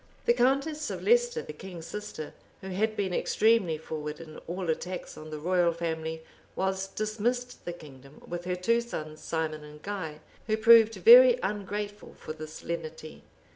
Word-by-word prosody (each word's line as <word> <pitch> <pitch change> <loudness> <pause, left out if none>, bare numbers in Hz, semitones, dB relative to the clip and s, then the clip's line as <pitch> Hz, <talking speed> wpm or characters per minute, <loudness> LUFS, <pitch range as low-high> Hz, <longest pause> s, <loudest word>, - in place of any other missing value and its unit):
The 235 - +5
countess 275 +5 +1
of - - -5
Leicester, 480 +1 +3
the - - -8
king's 180 -4 -9
sister, 210 -7 -6 0.3
who 190 - -7
had 215 +4 0
been 190 -3 -1
extremely 210 -5 +2
forward 150 -1 -6
in 160 -2 -10
all 180 +2 -4
attacks 180 +3 -5
on 155 0 -10
the 155 - -5
royal 175 +2 +2
family, 160 -1 -3 0.3
was 190 0 -1
dismissed 230 +5 -2
the 175 - -3
kingdom 140 -3 -14
with 175 0 -6
her 180 0 -1
two 230 +6 +2
sons, 155 -10 -7
Simon 155 -2 -3
and 150 0 -12
Guy, 170 -7 -5 0.3
who 215 -1 +1
proved 225 0 +7
very - - +9
ungrateful 205 0 -4
for - - -7
this 155 0 -9
lenity. 160 -2 -6
185 Hz, 165 wpm, -29 LUFS, 160-220 Hz, 0.3 s, very